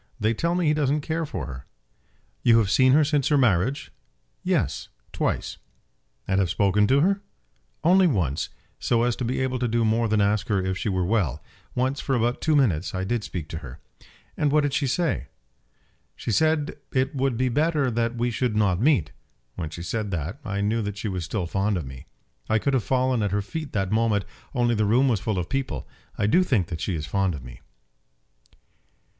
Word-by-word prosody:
They 110 +2 +2
tell 170 +9 0
me 180 -1 +1
he 150 - +4
doesn't 150 0 +1
care 160 +1 -2
for 85 - -4
her." 65 -3 -8 0.7
"You 115 -1 +5
have 105 -4 +2
seen 130 +4 +5
her 155 +2 +6
since 145 -2 +1
her 150 - +3
marriage?" 125 +1 +1 0.5
"Yes; - - -1 0.2
twice." - - -2 0.7
"And 95 0 +2
have 95 -3 +1
spoken 100 +3 +3
to 135 +2 +4
her?" 195 +4 +2 0.6
"Once 185 +2 +5
only, 75 -8 0 0.4
so 115 -1 +2
as 120 -1 +1
to - - -3
be 125 +2 -1
able 130 -1 -1
to 125 - 0
do 115 0 +1
more 115 +1 +2
than 110 0 +1
ask 100 0 +1
her 105 -3 +1
if 95 0 -1
she 105 - -2
were 95 -2 0
well. 95 - 0 0.3
Once, 130 +3 0
for 135 - 0
about 120 +1 0
two 155 -2 +2
minutes, 100 - +1
I 95 - -1
did 115 +3 -1
speak 80 -2 -5
to 80 - -5
her." 65 +1 -10 0.6
"And 145 -1 +1
what 150 +1 +4
did 145 -2 -1
she 140 -1 +1
say?" 160 - 0 0.9
"She - - -4
said 155 +4 +1
it 130 0 0
would 135 -3 0
be 130 +1 +1
better 145 0 +1
that 115 +1 0
we 120 +1 0
should 120 -1 -1
not 100 -3 +2
meet. 115 - +3 0.4
When 80 +1 -5
she 85 +1 -7
said 105 +4 -2
that, 85 - -4
I 100 -3 -2
knew 110 +3 +1
that 105 -1 -4
she 105 +1 -3
was 90 -3 -3
still 90 +3 -2
fond 100 +3 0
of 80 - -4
me. 65 -1 -10 0.4
I 110 - +3
could 140 +5 0
have 130 -5 +2
fallen 130 0 +1
at 105 - +1
her 100 +1 -1
feet 155 +7 -6
that 95 -3 -1
moment, 110 -2 +2 0.3
only 120 -1 +2
the 110 -1 +1
room 125 +6 +4
was 115 -6 +2
full 110 -1 -2
of 90 -1 -2
people. 130 - -3 0.3
I - - +1
do 120 - +4
think 110 - +1
that 80 -2 -5
she 95 - -1
is 75 -2 -3
fond 95 +1 0
of 70 - -8
me." 60 +1 -11
115 Hz, 210 wpm, -25 LUFS, 95-135 Hz, 0.9 s, her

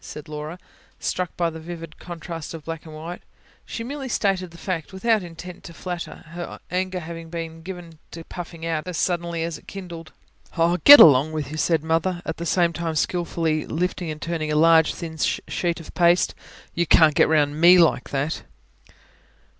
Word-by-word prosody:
said 150 +2 -9
Laura, 150 +2 -6 0.4
struck 180 -1 -3
by 170 - +1
the 160 - -8
vivid 165 -1 -9
contrast 165 -2 -7
of 160 - -10
black 165 0 -6
and 155 - -10
white. 165 +3 -7 0.5
She 230 - -5
merely 270 +2 -5
stated 195 -5 0
the 170 - -14
fact, 170 -2 -4
without 215 +3 +1
intent 175 +1 -10
to 170 - -10
flatter, 175 -1 -6
her 175 0 -7
anger 180 -3 -3
being 165 -1 -6
given 170 -2 -9
to 165 - -9
puffing 170 -1 -8
out 165 0 -2
as 180 -3 -4
suddenly 170 -2 -1
as 165 -1 -4
it - - -24
kindled. 170 -4 -8 0.5
"Oh, 170 +1 +3
get 290 0 +12
along 145 +1 +7
with 150 -3 -4
you!" 155 - -5
said 160 -1 +1
Mother, 165 +3 0
at 160 - -4
the 170 - -4
same 170 -1 +2
time 165 -1 -3
skilfully 165 -1 -1
lifting 175 +1 -2
and 155 0 -5
turning 160 -2 -3
a - - 0
large, 160 +1 +5
thin 160 -1 -7
sheet 170 +2 -1
of 165 - -11
paste. 175 0 +3 0.4
"You 170 0 0
can't 155 -1 +6
get - - +4
round 150 -1 +2
ME 175 +2 +8
like 165 -7 +3
that." 145 +3 -2
165 Hz, 185 wpm, -23 LUFS, 160-175 Hz, 0.5 s, get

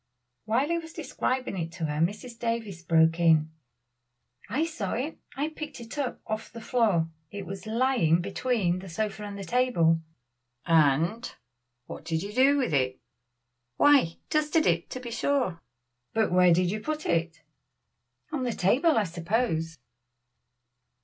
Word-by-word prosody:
While 245 +7 +1
he 340 0 +1
was 325 -1 -10
describing 260 - -2
it 165 0 -3
to 165 - -3
her 150 0 -2
Mrs. 225 +6 -3
Davies 230 -6 -3
broke 165 0 +3
in: 160 -2 +4 1.0
"I 280 +10 +1
saw 230 - -4
it 275 +7 -3 0.2
I 290 +3 -1
picked 310 -3 -8
it 235 0 -9
up 260 -4 -2
off 215 0 -4
the 230 - -8
floor 210 -9 +1 0.2
it 200 +1 -7
was 195 +3 -7
lying 225 -8 +2
between 195 -1 0
the 190 0 -9
sofa 210 +4 -3
and 205 -1 -6
the 200 - -6
table." 175 -8 +2 0.6
"And 165 - +2 0.5
what - - -9
did 160 0 -2
you 205 +1 -6
do 270 +4 +5
with 255 - 0
it?" 130 -2 +1 0.8
"Why, 275 - +5
dusted 305 +1 +2
it, 170 -1 +1
to 255 - -5
be 245 -2 -7
sure." 240 -7 0 0.5
"But 220 -3 +2
where 180 0 +5
did 175 +1 +3
you 215 - -2
put 310 +6 -4
it?" 165 -1 -1 0.9
"On 300 -4 -2
the 245 -2 -1
table, 265 - +3
I 220 - +4
suppose." 170 -2 -1
210 Hz, 155 wpm, -27 LUFS, 165-255 Hz, 1.0 s, do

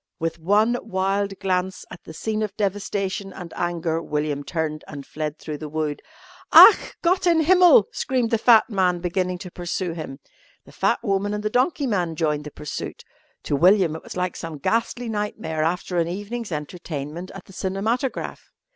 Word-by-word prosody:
With 165 0 -3
one 210 +8 +3
wild 195 -1 -1
glance 185 0 -1
at - - -11
the 160 - -9
scene 215 +5 -2
of 210 -2 -3
devastation 200 -1 -2
and 175 -3 -9
anger, 170 -2 -1
William 150 -2 -2
turned 155 -1 -3
and 140 -2 -8
fled 155 0 -4
through 150 -2 -6
the 155 - -6
wood. 155 -1 -2 0.5
"Ach! 445 - +8
Gott 360 +1 +2
in 335 -2 +4
Himmel!" 350 - +6
screamed 250 -3 -1
the 230 - +2
fat 225 -1 +6
man, 185 -5 +1
beginning 180 +1 -1
to 180 0 -9
pursue 175 0 -3
him. 155 -5 -7 0.5
The - - -15
fat - - 0
woman 205 0 0
and 210 - -4
the 215 - -1
donkey 275 +4 +1
man 180 -9 -1
joined 150 -2 -1
the - - -5
pursuit. 150 - -6 0.4
To - - -1
William 180 +1 +4
it 160 - -7
was - - -9
like 180 -1 -1
some 165 -2 -6
ghastly 230 - -1
nightmare 205 -7 -3
after 175 +2 -1
an 165 - +1
evening's 205 +4 -5
entertainment 155 +1 -5
at 195 - -10
the 195 - -15
cinematograph. 215 +8 -2
185 Hz, 175 wpm, -23 LUFS, 160-210 Hz, 0.5 s, Ach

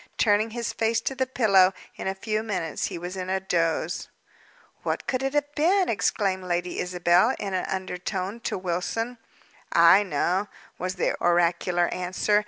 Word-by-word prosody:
Turning 215 0 +3
his 235 0 -4
face 225 0 +1
to 250 - -2
the 260 0 -1
pillow, 200 -7 +4 0.2
in - - -5
a 190 - -1
few 215 +2 -2
minutes 185 -8 -2
he - - -4
was 175 +2 -6
in 185 -1 -4
a 190 0 +1
doze. 170 -4 -1 0.7
"What - - -2
could 255 -1 -1
it 270 +1 -2
have 290 0 0
been?" 365 +5 +2
exclaimed 195 -3 0
Lady 175 0 -2
Isabel, 180 +6 +3
in 195 -2 -4
an 185 - -1
undertone, 190 +2 -3
to 230 - -3
Wilson. 190 +7 -3 0.5
"I 170 +4 +7
know," 185 +2 0 0.3
was 185 +1 -3
the 180 - 0
oracular 175 0 +2
answer. 185 +3 +1
190 Hz, 165 wpm, -26 LUFS, 180-225 Hz, 0.7 s, I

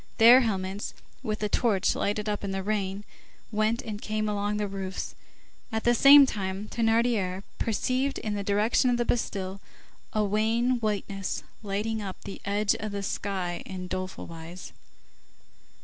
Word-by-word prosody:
Their 240 +3 +9
helmets, 195 -3 -2 0.3
which 215 -1 -2
the 210 - -1
torch 205 -2 +2
lighted 210 +1 -1
up 205 -1 -2
in 200 - -2
the 195 0 -2
rain, 200 -1 -2 0.5
went 215 +3 +1
and 210 -1 -6
came 215 0 -1
along 205 0 -1
the 210 -1 -1
roofs. 195 -1 -5 0.6
At 220 0 -1
the 240 - +4
same 280 +3 +9
time, 195 -3 -3
Thénardier 225 -5 +1 0.2
perceived 255 +5 0
in 215 - -3
the 205 - -2
direction 210 +5 +2
of 245 - +2
the 240 - 0
Bastille 195 -5 -2 0.5
a 215 - +1
wan 225 +4 +1
whiteness 200 -3 -2 0.2
lighting 215 +2 -2
up 195 -2 -5
the 195 - -8
edge 200 +1 +2
of 215 -1 -4
the 200 0 -3
sky 190 -3 -2
in 185 -1 -6
doleful 185 +1 -4
wise. 165 +2 -9
210 Hz, 155 wpm, -28 LUFS, 195-225 Hz, 0.6 s, Their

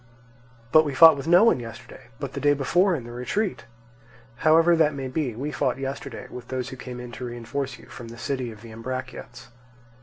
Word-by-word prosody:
"But 155 +2 +7
we 145 -3 -4
fought 160 +1 +9
with 140 +2 -6
no 175 +4 +7
one 230 - +4
yesterday; 120 +1 -10
but 140 -2 -5
the - - -4
day 145 0 +3
before 175 +7 +2
in 135 - -5
the 120 - -9
retreat." 180 - -2 0.7
"However 165 +4 +5
that 155 -2 +3
may 135 -1 -4
be, 130 -3 -2
we 140 +6 -4
fought 130 -4 0
yesterday 135 -2 -6
with 125 -1 -10
those 130 -2 -3
who - - -8
came 125 -1 -8
to 125 - -8
reinforce 120 +2 -4
you - - -16
from 120 - -10
the 115 +1 -10
city 130 0 -3
of 105 -1 -13
the 115 - -11
Ambraciots." 125 0 -7
130 Hz, 205 wpm, -25 LUFS, 120-150 Hz, 0.7 s, fought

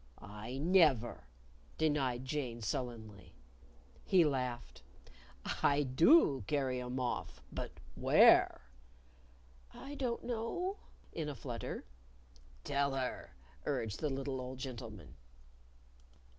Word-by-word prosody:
"I 105 +5 -7
never!" 145 - +3 0.5
denied 135 -5 +1
Jane, 130 -5 -3
sullenly. 110 -3 -5 0.7
He 180 -4 +5
laughed. 125 -4 -2 0.8
"I 145 +1 +4
do 140 - +5
carry 130 -3 0
'em 125 +1 -4
off. 125 -1 -3
But - - -5 0.2
where?" - - +6 1.1
"I 280 - -8
don't 250 -4 -2
know," 250 - -2 0.4
in 155 -2 -3
a 145 - -5
flutter. 120 -4 -5 0.8
"Tell 140 -1 0
her," 130 - -4 0.3
urged 105 -3 -1
the 150 - 0
little 135 -1 -3
old 130 +1 -6
gentleman. 120 -6 -7
130 Hz, 100 wpm, -35 LUFS, 120-150 Hz, 1.1 s, where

